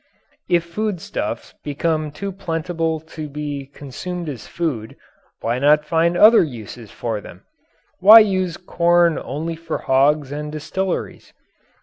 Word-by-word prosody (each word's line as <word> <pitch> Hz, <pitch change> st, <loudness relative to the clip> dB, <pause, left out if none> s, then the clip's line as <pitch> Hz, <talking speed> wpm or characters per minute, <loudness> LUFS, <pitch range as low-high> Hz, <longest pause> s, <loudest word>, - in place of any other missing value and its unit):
If 170 Hz, -1 st, +3 dB
foodstuffs 180 Hz, +1 st, -4 dB
become 155 Hz, +1 st, -1 dB
too 195 Hz, +7 st, -5 dB
plentiful 165 Hz, -3 st, -2 dB
to 155 Hz, -1 st, -8 dB
be 145 Hz, -1 st, -5 dB
consumed 160 Hz, +5 st, -7 dB
as 130 Hz, -6 st, -7 dB
food, 135 Hz, -11 st, -3 dB, 0.5 s
why 120 Hz, +2 st, -1 dB
not 150 Hz, +2 st, +4 dB
find 170 Hz, +2 st, +1 dB
other 220 Hz, +4 st, +8 dB
uses 120 Hz, -, -6 dB
for 110 Hz, -3 st, -4 dB
them? -, -, -13 dB, 0.6 s
Why 215 Hz, +4 st, +10 dB
use 185 Hz, -5 st, 0 dB
corn 175 Hz, -2 st, +2 dB
only 155 Hz, +6 st, -4 dB
for 165 Hz, -1 st, -4 dB
hogs 140 Hz, +1 st, +2 dB
and 150 Hz, +1 st, -5 dB
distilleries? 185 Hz, +5 st, -4 dB
160 Hz, 125 wpm, -20 LUFS, 145-175 Hz, 0.6 s, Why